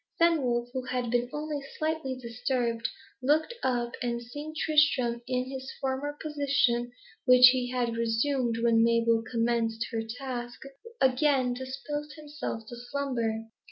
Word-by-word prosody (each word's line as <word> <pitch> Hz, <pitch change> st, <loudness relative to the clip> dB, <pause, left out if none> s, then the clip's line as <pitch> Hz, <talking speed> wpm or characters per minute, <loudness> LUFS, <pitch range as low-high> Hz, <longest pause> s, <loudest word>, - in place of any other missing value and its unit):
Fenwolf, 255 Hz, -8 st, +2 dB
who 260 Hz, -, -2 dB
had 250 Hz, -2 st, -2 dB
been 245 Hz, 0 st, +1 dB
only 295 Hz, -1 st, -3 dB, 0.2 s
slightly 310 Hz, -4 st, -1 dB
disturbed, 235 Hz, -1 st, -1 dB, 0.3 s
looked 305 Hz, -, +2 dB
up, 240 Hz, -2 st, 0 dB
and 240 Hz, -1 st, -1 dB
seeing 290 Hz, +6 st, -8 dB
Tristram 295 Hz, -7 st, +3 dB
in 255 Hz, 0 st, -1 dB
his 265 Hz, 0 st, -6 dB
former 275 Hz, +2 st, -2 dB
position, 280 Hz, -5 st, +1 dB, 0.3 s
which 250 Hz, 0 st, +9 dB
he 255 Hz, -1 st, 0 dB
had 245 Hz, -2 st, -1 dB
resumed 230 Hz, +1 st, +1 dB
when 230 Hz, -1 st, +4 dB
Mabel 230 Hz, 0 st, +3 dB
commenced 230 Hz, -1 st, 0 dB
her 225 Hz, -2 st, -1 dB
task, 240 Hz, +1 st, -6 dB, 0.4 s
again 260 Hz, -1 st, +3 dB
disposed 275 Hz, +4 st, -5 dB
himself 295 Hz, -6 st, -6 dB
to 240 Hz, -, -7 dB
slumber. 240 Hz, -3 st, -2 dB
250 Hz, 130 wpm, -29 LUFS, 235-280 Hz, 0.4 s, which